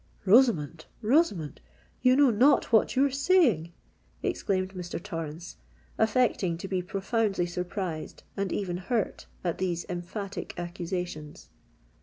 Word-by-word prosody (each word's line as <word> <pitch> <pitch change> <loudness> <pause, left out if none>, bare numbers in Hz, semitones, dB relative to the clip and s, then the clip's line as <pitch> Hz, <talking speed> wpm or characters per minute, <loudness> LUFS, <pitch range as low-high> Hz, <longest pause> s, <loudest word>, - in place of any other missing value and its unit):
"Rosamond—Rosamond—you 215 - +1
know 280 -2 +5
not 255 +5 +4
what 220 - +4
you 270 +2 +4
are 280 - 0
saying!" 275 - +3 0.5
exclaimed 190 -1 -1
Mr. 180 -2 -5
Torrens, 165 -3 -6 0.4
affecting 220 -6 +2
to 185 - -6
be 185 -1 -1
profoundly 195 0 0
surprised 175 -2 -4
and 195 -2 -2
even 180 -3 -2
hurt 215 +3 -2 0.2
at 175 -2 -2
these 175 -2 -1
emphatic 180 +3 -5
accusations. 175 -3 -5
190 Hz, 110 wpm, -28 LUFS, 175-225 Hz, 0.5 s, know